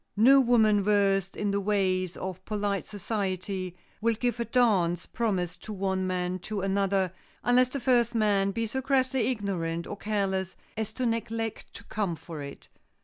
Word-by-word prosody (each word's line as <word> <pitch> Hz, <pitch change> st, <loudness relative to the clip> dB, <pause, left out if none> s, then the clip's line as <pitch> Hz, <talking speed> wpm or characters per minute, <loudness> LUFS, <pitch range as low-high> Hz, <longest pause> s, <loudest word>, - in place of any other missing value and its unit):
No 270 Hz, +6 st, +7 dB
woman 220 Hz, -4 st, +4 dB
versed 195 Hz, -1 st, +2 dB
in 205 Hz, -1 st, -1 dB
the 200 Hz, 0 st, 0 dB
ways 185 Hz, -3 st, 0 dB
of 185 Hz, 0 st, -5 dB
polite 205 Hz, -2 st, -2 dB
society 190 Hz, -3 st, -3 dB, 0.2 s
will 230 Hz, +1 st, +2 dB
give 240 Hz, +1 st, -1 dB
a 235 Hz, -, 0 dB
dance 195 Hz, -8 st, +2 dB
promised 190 Hz, -7 st, -2 dB
to 215 Hz, -, -5 dB
one 190 Hz, -1 st, -1 dB
man 180 Hz, 0 st, -1 dB
to 205 Hz, +2 st, -4 dB
another, 195 Hz, -1 st, +1 dB, 0.3 s
unless 250 Hz, +1 st, +4 dB
the 280 Hz, -, -3 dB
first 240 Hz, -2 st, +2 dB
man 205 Hz, -3 st, +3 dB
be 225 Hz, +3 st, -1 dB
so 265 Hz, +4 st, -2 dB
crassly 260 Hz, -2 st, +1 dB
ignorant 180 Hz, -8 st, -2 dB
or -, -, -5 dB
careless 195 Hz, -3 st, -1 dB, 0.2 s
as 220 Hz, 0 st, -3 dB
to 255 Hz, -, -2 dB
neglect 225 Hz, -1 st, -2 dB
to -, -, -9 dB
come 200 Hz, -6 st, -2 dB
for 160 Hz, -1 st, -8 dB
it. 140 Hz, 0 st, -9 dB
205 Hz, 165 wpm, -28 LUFS, 185-230 Hz, 0.3 s, No